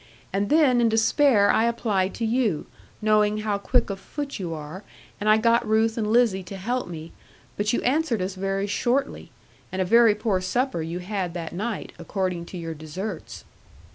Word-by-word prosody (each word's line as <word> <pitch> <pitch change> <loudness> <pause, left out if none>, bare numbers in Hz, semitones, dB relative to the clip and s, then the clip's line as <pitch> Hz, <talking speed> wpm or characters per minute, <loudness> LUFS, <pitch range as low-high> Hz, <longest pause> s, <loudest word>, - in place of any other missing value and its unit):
And 200 +1 0
then, 285 -6 +4
in 230 - +4
despair, 225 -1 +4
I 225 - +3
applied 210 -5 0
to 230 - -2
you, 220 -8 0 0.4
knowing 215 0 +3
how 210 -2 -1
quick 200 - +1
of 195 - -5
foot 285 +1 -6
you 175 -3 -4
are, 160 +5 -7 0.4
and 210 - 0
I 215 - +6
got 230 +2 +3
Ruth 220 +1 +2
and 220 -2 -1
Lizzie 230 -5 +3
to 195 +2 -8
help 245 +7 -2
me, 165 -1 -8 0.4
but 210 +1 0
you - - -1
answered 265 -3 +1
us 185 +1 -2
very 195 +1 -2
shortly; 240 +6 -1 0.4
and 190 - -4
a 185 - +2
very 230 +2 +5
poor 210 -4 0
supper 240 +1 -1
you 165 +2 -4
had 180 -1 -3
that 165 -2 -5
night, 215 +5 -4
according 185 -4 -2
to 185 - -8
your 165 -1 -5
deserts. 160 +5 -7
210 Hz, 185 wpm, -25 LUFS, 185-230 Hz, 0.4 s, I